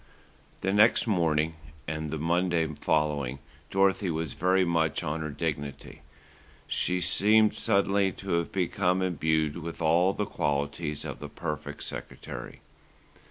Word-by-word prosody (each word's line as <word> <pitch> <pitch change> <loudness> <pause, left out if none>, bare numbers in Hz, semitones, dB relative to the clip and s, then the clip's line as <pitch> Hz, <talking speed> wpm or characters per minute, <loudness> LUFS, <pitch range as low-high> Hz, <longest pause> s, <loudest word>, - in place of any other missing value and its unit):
The 95 +1 0
next 105 +3 +5
morning 80 -6 +1 0.3
and 80 0 -3
the 80 - -3
Monday 85 +1 +1
following, 75 -3 0 0.3
Dorothy 95 0 +2
was 80 -4 -2
very 95 +3 +2
much 80 -3 +1
on 80 +2 -2
her 75 - -3
dignity. 70 -2 -4 0.6
She 90 0 0
seemed 105 +4 +4
suddenly 100 0 +2
to 95 -1 -7
have 85 0 0
become 90 0 +1
imbued 80 -3 0
with 85 0 -6
all 85 +4 +3
the 105 - -2
qualities 75 -1 -2
of - - -6
the - - -7
perfect 75 - -5
secretary. - - -8
85 Hz, 130 wpm, -28 LUFS, 75-95 Hz, 0.6 s, next